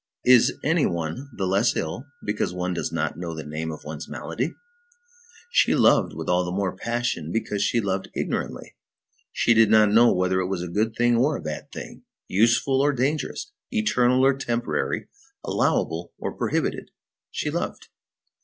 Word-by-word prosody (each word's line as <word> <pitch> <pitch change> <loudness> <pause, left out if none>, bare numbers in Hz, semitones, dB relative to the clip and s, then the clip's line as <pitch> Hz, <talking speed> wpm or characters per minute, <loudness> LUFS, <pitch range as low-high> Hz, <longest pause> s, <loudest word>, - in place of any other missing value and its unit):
Is 125 -2 +6
any 160 +1 +3
one 85 - -4
the 95 - -3
less 100 +5 +2
ill 115 - -4 0.2
because 105 -3 -1
one 90 0 -2
does 85 - -3
not 80 0 -2
know 85 -2 -4
the 80 - -7
name 80 +2 -4
of 75 - -9
one's 75 0 -7
malady? 130 +8 -4 1.0
She - - +4
loved - - +4
with - - -6
all 90 0 +2
the 90 - -4
more 95 0 -1
passion 120 -8 -2
because 105 -1 -2
she 110 +3 +2
loved 95 -3 -2
ignorantly. - - -3 0.6
She 115 - +3
did 110 -2 +5
not 110 -1 +5
know 115 +2 +6
whether 90 +1 +1
it 90 - -1
was 95 -2 -2
a - - -4
good 110 +6 -1
thing 120 0 +3
or 140 +5 +2
a - - -4
bad 75 -1 -6
thing, - - -9 0.3
useful 120 +6 +3
or 145 +1 +3
dangerous, 145 - -2 0.2
eternal 130 - +2
or 135 - +5
temporary, 120 -3 -2 0.4
allowable - - 0
or - - -4
prohibited; - - -1 0.4
she - - -3
loved. - - -4
105 Hz, 170 wpm, -24 LUFS, 90-125 Hz, 1.0 s, Is